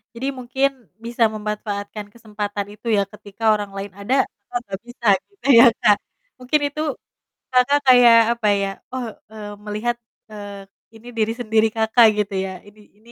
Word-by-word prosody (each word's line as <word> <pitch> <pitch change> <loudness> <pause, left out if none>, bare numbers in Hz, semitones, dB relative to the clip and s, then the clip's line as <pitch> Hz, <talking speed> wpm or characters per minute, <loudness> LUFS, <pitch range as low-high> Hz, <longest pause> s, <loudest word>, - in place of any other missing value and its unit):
Jadi 250 +3 -4
mungkin 260 +2 0 0.3
bisa 235 +1 -1
memanfaatkan 210 -1 -5
kesempatan 210 -3 -5
itu 215 +3 -12
ya, 205 -2 +3
ketika 210 +1 -13
orang 205 -1 -5
lain 195 0 -6
ada, 200 +6 -1 0.4
Kakak, 245 0 -2
gak - - -10
bisa 240 -1 -6 0.2
gitu 400 -8 -9
ya, 235 - +9
Kak? 205 -1 +4 0.4
Mungkin 255 +4 0
itu, 290 +2 -5 0.7
Kakak 255 +3 +4
kayak, 245 -3 +7 0.2
apa 235 -2 -2
ya, 200 -1 0 0.2
oh, 255 -1 -4 0.2
eee, 210 -1 -8
melihat, 210 +3 -2 0.4
eee, 205 -1 -9 0.3
ini 225 +2 -16
diri 225 -1 0
sendiri 225 -2 +2
Kakak, 220 +1 +4 0.2
gitu 200 - -12
ya, 190 -1 -5
ini 205 0 -19
ini, 230 +3 -19
220 Hz, 160 wpm, -21 LUFS, 205-240 Hz, 0.7 s, ya